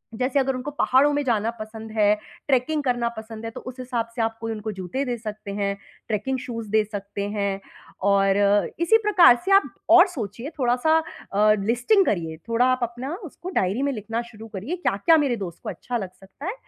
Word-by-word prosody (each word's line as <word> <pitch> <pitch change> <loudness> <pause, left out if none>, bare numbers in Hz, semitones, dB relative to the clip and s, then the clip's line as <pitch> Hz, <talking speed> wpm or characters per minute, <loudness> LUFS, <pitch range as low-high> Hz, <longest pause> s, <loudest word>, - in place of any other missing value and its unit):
जैसे 255 +4 +1
अगर 270 -1 +1
उनको 260 +4 -5
पहाड़ों 285 0 +3
में 290 0 0
जाना 230 -3 +1
पसंद 220 0 -8
है, 210 -1 +4 0.3
ट्रैकिंग 285 +3 +1
करना 245 -2 0
पसंद 220 0 -8
है, 225 - -4
तो - - -8
उस 255 - -8
हिसाब 245 -2 -2
से 235 - -1
आप 225 0 -1
कोई 225 - -3
उनको 215 0 -4
जूते 190 +7 -3
दे 245 -1 -2
सकते 215 -2 -7
हैं, 200 -1 -1 0.3
ट्रैकिंग 225 +5 -1
शूज़ 230 -4 -6
दे 220 -1 +4
सकते 200 0 -4
हैं। 200 -2 -1 0.5
और 195 0 +3 0.4
इसी 395 +7 +5
प्रकार 365 -11 +7
से 390 - 0
आप 390 +1 +7 0.3
और 355 +3 +8
सोचिए, 235 - -6
थोड़ा-सा 250 +6 +3 0.4
अ, 215 +1 +5
लिस्टिंग 245 - +3
करिए, 165 -4 -1
थोड़ा 230 +2 +3
आप 255 0 +2
अपना 240 +5 -4
उसको 350 +3 -8
डायरी 195 +7 0
में 280 - +1
लिखना 225 +2 -3
शुरू 220 0 -11
करिए, 230 - -3
क्या-क्या 325 - +3
मेरे 275 -5 +1
दोस्त 170 -1 -10
को - - -4
अच्छा 245 -1 -4
लग 190 -4 -5
सकता 195 - -12
है। 400 - -1
230 Hz, 200 wpm, -24 LUFS, 210-265 Hz, 0.5 s, और